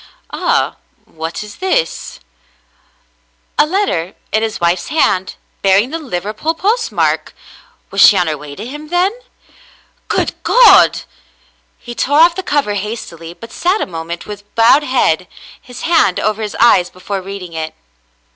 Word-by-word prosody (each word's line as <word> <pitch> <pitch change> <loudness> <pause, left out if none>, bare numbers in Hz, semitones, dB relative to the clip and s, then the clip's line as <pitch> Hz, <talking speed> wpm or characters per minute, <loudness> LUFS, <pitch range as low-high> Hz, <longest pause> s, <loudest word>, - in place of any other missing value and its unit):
"Ah, - - 0 0.3
what 160 +5 -6
is 210 -1 -11
this 430 +6 -2 1.4
?'^ - - +6
A - - -2
letter 300 - -1 0.2
in 220 - +1
his 225 -1 -2
wife's 175 +1 0
hand, 190 -12 +1 0.3
bear 195 -1 +4
ing 230 +7 +1
the 330 - -3
Liverpool 220 - -3
postmark! 455 +7 0 0.6
Was - - +1
she 205 - +8
on 180 - +2
her 155 -2 -1
way 145 -1 -10
to 210 - -7
him, 295 +5 -8
then? 355 +4 +1 1.0
"Good - - 0
God! 455 -6 +6 0.4
" - - -34 0.3
He 240 - -9
tore 285 +6 +2
off 335 +1 +6
the 375 - -4
cover 285 - 0
hastily, 190 -5 -6
but 230 +3 -12
sat 370 +5 0
a - - -1
moment 170 -1 -6
with 205 -1 -10
bowed 230 +5 +5
head, 245 - +1 0.3
his 250 - -11
hand 320 - +3
over 215 +1 -1
his 210 -1 -4
eyes, 185 -7 +5
before 190 +2 -5
reading 185 -2 -8
it. 160 -1 -5
215 Hz, 155 wpm, -16 LUFS, 180-305 Hz, 1.4 s, she